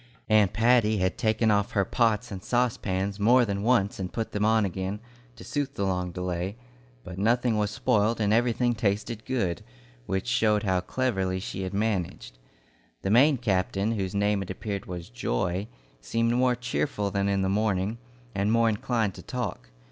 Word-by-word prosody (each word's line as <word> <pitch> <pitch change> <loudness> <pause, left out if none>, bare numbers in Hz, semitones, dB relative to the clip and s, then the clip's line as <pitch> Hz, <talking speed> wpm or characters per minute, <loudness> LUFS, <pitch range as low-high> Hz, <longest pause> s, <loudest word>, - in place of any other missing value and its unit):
Aunt 105 -3 +5
Patty 110 -1 +3
had 95 -1 0
taken 110 0 +2
off 100 -1 +1
her 100 -1 +2
pots 115 +1 +1
and 95 -2 -6
saucepans 100 -5 -1
more 120 +4 +5
than 100 -2 -2
once 105 -4 +2
and 90 -1 -4
put 115 -1 -3
them 105 - -1
on 110 0 +3
again, 95 +2 -3 0.4
to - - -12
suit 145 -1 -3
the 100 - -1
long 90 -2 -1
delay; 90 +2 -3 0.5
but 90 0 -8
nothing 120 +2 +2
was 105 -1 +1
spoiled 115 -1 +1
and 105 -1 +2
everything 120 +1 +2
tasted 105 +1 -2
good, 105 -10 -1 0.5
which 95 0 -1
showed 110 -4 +2
how 95 -3 +1
cleverly 95 -3 -1
she 95 - -5
had 95 +1 -4
managed. 90 - -2 0.6
The 95 - 0
Maine 135 +5 +5
captain 100 -2 0
whose 100 -4 -2
name 100 0 +1
it 95 - -6
appeared 100 +1 -5
was 90 -2 -6
Joy 85 - -2 0.3
seemed 115 - 0
more 125 0 +3
cheerful 125 -4 -2
than 100 0 0
in 100 -1 +1
the - - +1
morning, 100 +1 0 0.3
and 100 +1 0
more 115 0 +4
inclined 110 -1 0
to - - -10
talk. - - -5
105 Hz, 175 wpm, -27 LUFS, 95-115 Hz, 0.6 s, Aunt